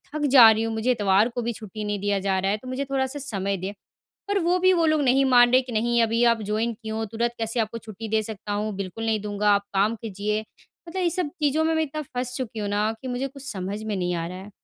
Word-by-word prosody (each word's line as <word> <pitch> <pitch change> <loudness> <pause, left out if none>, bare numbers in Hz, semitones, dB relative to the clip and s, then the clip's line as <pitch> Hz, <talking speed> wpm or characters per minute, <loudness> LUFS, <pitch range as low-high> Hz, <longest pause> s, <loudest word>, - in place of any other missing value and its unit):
थक 300 -1 0
जा 230 -4 +11
रही 220 0 0
हूँ। 225 0 -2
मुझे 220 +3 +1
इतवार 205 -1 +3
को 245 0 -4
भी 235 0 -2
छुट्टी 215 0 -8
नहीं 205 -1 -2
दिया 200 0 0
जा 190 0 0
रहा 195 +1 0
है, 210 - 0
तो 255 - -13
मुझे 260 +2 -3
थोड़ा 270 -1 0
सा 290 +3 -5
समय 200 -8 -2
दें। 190 +2 -4 0.6
पर 405 0 +1
वो 350 +2 +2
भी 370 +1 +4
वो 335 -3 +2
लोग 310 -1 +2
नहीं 270 +1 +3
मान 245 -2 +6
रहे 255 - +6
कि, 250 - -9
"नहीं, 235 +2 +2
अभी 230 +1 +1
आप 230 -1 +3
जॉइन 215 +3 -1
किये 220 0 -7
हो, 220 0 -2
तुरंत 235 +3 -2
कैसे 225 +1 -1
आपको 225 +1 -2
छुट्टी 220 0 -8
दे 220 0 +1
सकता 210 -1 -6
हूँ? 210 +1 -2
बिल्कुल 195 +3 -5
नहीं 220 -1 +1
दूँगा, 210 0 0
आप 200 - +1
काम 205 +4 +2
कीजिए।" 210 0 -2 0.5
मतलब 370 +2 -3
ये 345 - +2
सब 345 -3 -1
चीज़ों 300 +1 +2
में 320 0 +1
मैं 320 - +2
इतना 305 0 -4
फँस 250 0 -1
चुकी 245 -4 -4
हूँ 205 - -2
ना, 210 +2 0
कि 260 - -5
मुझे 250 +2 -2
कुछ 275 +1 -7
समझ 195 +2 -4
में 215 -2 -3
नहीं 180 -1 -1
आ 165 -1 -2
रहा 180 +1 -7
है। 195 +2 -10
225 Hz, 280 wpm, -24 LUFS, 205-260 Hz, 0.6 s, जा